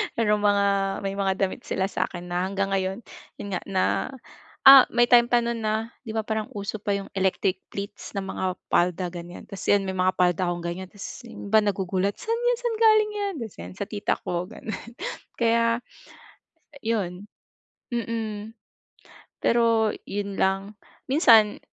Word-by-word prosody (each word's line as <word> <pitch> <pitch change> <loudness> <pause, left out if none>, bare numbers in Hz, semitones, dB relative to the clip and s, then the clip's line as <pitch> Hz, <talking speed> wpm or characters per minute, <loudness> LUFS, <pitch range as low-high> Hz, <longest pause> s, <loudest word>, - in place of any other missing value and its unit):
Merong 210 -2 +2
mga 205 -1 +3 0.4
may 195 - -1
mga 195 -1 +1
damit 195 -1 -2
sila 190 +1 -1
sa 185 - 0
akin 175 -1 -8
na 180 +1 0
hanggang 195 0 -2
ngayon, 190 +3 -1 0.3
yun 205 - -7
nga, 180 - -1
na 190 -1 +1 0.8
ah, 270 -1 +10
may 240 0 +3
time 240 -1 +7
pa 240 -1 +3
noon 235 0 -2
na 220 +1 -1 0.2
'di 220 - -5
ba 220 - 0
parang 220 0 -2
uso 205 +1 -4
pa 205 -1 -1
yung 195 -1 -6
electric 190 0 0
pleats 200 +1 -7
ng 195 - -2
mga 190 - -5 0.3
palda 180 0 +1
ganyan. 175 0 -9
Tas 195 -3 -8
yan 205 -1 +4
may 190 - -2
mga 185 0 +1
palda 180 0 +2
kong 175 -1 -3
ganyan. 175 +2 -4
Tas 200 +2 -11 0.2
yung 205 -3 -9
iba 220 - +7
nagugulat, 195 -1 0
"Saan 460 -1 -2
yan, - - +3
saan 475 -2 -1
galing 435 -1 +5
yan?" 405 -2 -2
Tas 220 - -9
yan, - - -7
"Sa 200 - -3
tita 205 0 -1
ko." 175 +1 -2
Ganun. 220 - -8 0.6
Kaya 230 0 +2 1.0
'yon 205 -4 -2 0.7
Mm. 225 -1 -4 0.8
Pero 230 -2 +3 0.2
yun 200 0 -4
lang. 195 +2 0 0.4
Minsan 225 -8 +6
205 Hz, 170 wpm, -25 LUFS, 190-230 Hz, 1.0 s, ah